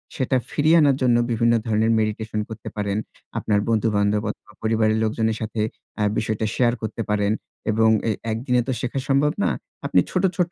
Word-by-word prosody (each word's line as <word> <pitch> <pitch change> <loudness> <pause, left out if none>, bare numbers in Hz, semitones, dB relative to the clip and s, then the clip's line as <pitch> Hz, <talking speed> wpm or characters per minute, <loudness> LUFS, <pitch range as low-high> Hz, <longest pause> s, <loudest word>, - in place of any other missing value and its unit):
সেটা 130 -3 +1
ফিরিয়ে 155 +3 +4
আনার 140 -3 +4
জন্য 125 -2 +4 0.2
বিভিন্ন 115 +1 +3
ধরনের 110 0 +2
মেডিটেশন 110 0 -2
করতে 110 -1 -7
পারেন। 100 0 -1 0.4
আপনার 105 -1 +1
বন্ধু-বান্ধব 105 -2 +1
অথবা, 105 - -9
পরিবারের 110 0 +2
লোকজনের 110 0 0
সাথে 110 0 -2 0.4
অ্যা 105 - +1
বিষয়টা 110 0 -1
শেয়ার 120 -1 +3
করতে 110 +1 -4
পারেন 105 -1 +1 0.4
এবং 110 +1 +4 0.2
এ - - +3 0.2
একদিনে 125 +2 +1
তো 130 - 0
শেখা 130 +2 -2
সম্ভব 140 +2 +3
না। - - +3 0.4
আপনি - - +3
ছোট, 185 +1 0
ছোট 175 -1 +1
110 Hz, 170 wpm, -23 LUFS, 110-125 Hz, 0.4 s, ফিরিয়ে